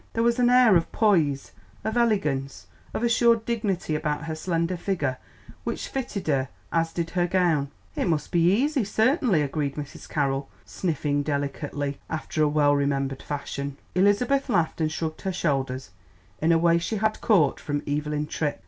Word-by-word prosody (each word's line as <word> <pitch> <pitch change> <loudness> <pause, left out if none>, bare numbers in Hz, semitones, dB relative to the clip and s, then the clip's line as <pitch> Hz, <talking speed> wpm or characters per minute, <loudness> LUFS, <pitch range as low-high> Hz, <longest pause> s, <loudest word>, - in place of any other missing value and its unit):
There 230 - +1
was 235 +1 +2
an 245 0 +4
air 245 -5 +6
of 165 - -3
poise, 160 -11 +2 0.3
of 220 +1 -2
elegance, 140 - 0 0.3
of - - -3
assured 235 -1 +3
dignity 205 -8 -1
about 150 -1 -1
her 165 -1 -4
slender 170 +2 -1
figure 170 -8 -2 0.4
which - - -4
fitted 245 -7 -4
her 135 -3 +1 0.2
as 165 -1 +1
did 165 -1 -3
her 175 -1 +1
gown. 170 -6 +2 0.3
"It - - 0
must 160 -3 -1
be 175 0 +4
easy, 270 +5 +2
certainly," 220 - +2
agreed 140 -1 -2
Mrs. 145 -2 -8
Carroll, 135 -2 -1 0.2
sniffing 150 -5 -1
delicately, 145 0 -3
after 155 0 -3
a 150 - +5
well 145 -1 +3
remembered 140 -1 -1
fashion. 140 -1 -5 0.2
Elizabeth 245 +9 +2
laughed 170 -6 +1
and 155 -1 +1
shrugged 160 -1 -4
her 190 - -2
shoulders 135 -6 -2 0.5
in 160 +2 +3
a 165 - +5
way 170 0 +4
she 195 +6 -3
had 215 +1 0
caught 165 - +3
from 145 -1 -3
Evelyn 150 +1 -1
Tripp. 150 -1 -2
165 Hz, 165 wpm, -25 LUFS, 145-205 Hz, 0.5 s, air